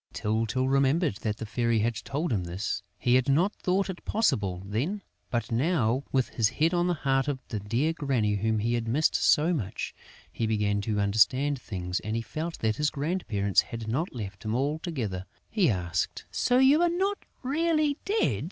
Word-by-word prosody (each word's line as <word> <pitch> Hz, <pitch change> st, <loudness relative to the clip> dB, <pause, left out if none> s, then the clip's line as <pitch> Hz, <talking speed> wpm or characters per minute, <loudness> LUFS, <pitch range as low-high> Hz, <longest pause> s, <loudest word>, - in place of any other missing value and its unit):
Tyltyl 115 Hz, +4 st, 0 dB
remembered 135 Hz, -, +2 dB
that 105 Hz, -1 st, -3 dB
the -, -, -5 dB
Fairy 115 Hz, +1 st, 0 dB
had 115 Hz, +2 st, +1 dB
told 140 Hz, +6 st, -3 dB
him 95 Hz, -5 st, -1 dB
this. 90 Hz, +4 st, -3 dB, 0.2 s
He 120 Hz, -, +1 dB
had 130 Hz, +2 st, +3 dB
not 175 Hz, +9 st, +3 dB
thought 190 Hz, +2 st, 0 dB
it 190 Hz, -2 st, -6 dB
possible 100 Hz, -, 0 dB
then; 145 Hz, -, -2 dB, 0.3 s
but 120 Hz, -2 st, -2 dB
now, 130 Hz, -1 st, +1 dB
with 130 Hz, -2 st, +1 dB
his 110 Hz, -3 st, +1 dB
head 160 Hz, +7 st, +1 dB
on 175 Hz, 0 st, +2 dB
the 175 Hz, -, +1 dB
heart 135 Hz, -2 st, +1 dB
of 145 Hz, -2 st, 0 dB
the 110 Hz, -, -2 dB
dear 120 Hz, +11 st, 0 dB
Granny 130 Hz, -9 st, 0 dB
whom 110 Hz, +2 st, +1 dB
he 115 Hz, +3 st, 0 dB
had 115 Hz, -1 st, -1 dB
missed 145 Hz, +7 st, +2 dB
so 160 Hz, +4 st, +3 dB
much, 110 Hz, -, -3 dB, 0.4 s
he 115 Hz, -, -2 dB
began 105 Hz, -2 st, +1 dB
to 105 Hz, 0 st, -1 dB
understand 125 Hz, +7 st, +2 dB
things 90 Hz, -3 st, -3 dB
and 110 Hz, +1 st, -4 dB
he 115 Hz, -, -1 dB
felt 160 Hz, +9 st, -4 dB
that 110 Hz, -1 st, +1 dB
his 150 Hz, 0 st, +2 dB
grandparents 140 Hz, -, +1 dB
had 115 Hz, -1 st, -7 dB
not 135 Hz, +11 st, -1 dB
left 100 Hz, -5 st, -7 dB
him 110 Hz, +1 st, -1 dB
altogether. 135 Hz, -, -2 dB, 0.2 s
He 205 Hz, -8 st, +3 dB
asked: 90 Hz, -5 st, -2 dB
"So 250 Hz, -, +2 dB
you 270 Hz, +5 st, +6 dB
are 345 Hz, -, +4 dB
not 385 Hz, +4 st, 0 dB, 0.2 s
really 305 Hz, +1 st, +1 dB
dead?..." 425 Hz, +3 st, +1 dB
125 Hz, 190 wpm, -28 LUFS, 110-165 Hz, 0.4 s, you